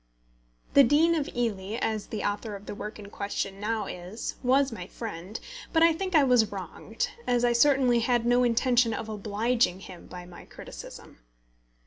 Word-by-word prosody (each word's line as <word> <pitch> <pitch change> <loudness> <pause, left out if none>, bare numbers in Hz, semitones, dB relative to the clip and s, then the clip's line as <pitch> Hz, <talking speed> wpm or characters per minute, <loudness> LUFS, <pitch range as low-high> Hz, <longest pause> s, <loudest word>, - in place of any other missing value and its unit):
The 280 - +8
Dean 305 +6 +4
of 305 -4 -1
Ely, 215 -4 -2
as 215 -2 -2
the 215 - -4
author 205 +1 -2
of 200 +1 -10
the - - -6
work 210 +1 -7
in 200 -1 -11
question 200 -1 -4
now 215 +1 -1
is, 180 +5 -6
was 265 +1 +3
my 185 -6 -7
friend; 205 -2 -7 0.3
but 325 -1 +4
I 335 0 +6
think 370 +2 -3
I 300 - +7
was 245 -5 +4
wronged, - - -4 0.2
as 245 -1 +2
I 240 - +3
certainly 255 -1 +4
had 235 0 +1
no 245 +1 +4
intention 240 -1 +3
of 220 - -5
obliging 215 -1 0
him 185 -3 -11
by 180 -1 -9
my 175 0 -12
criticism. - - -11
230 Hz, 175 wpm, -27 LUFS, 205-250 Hz, 0.3 s, The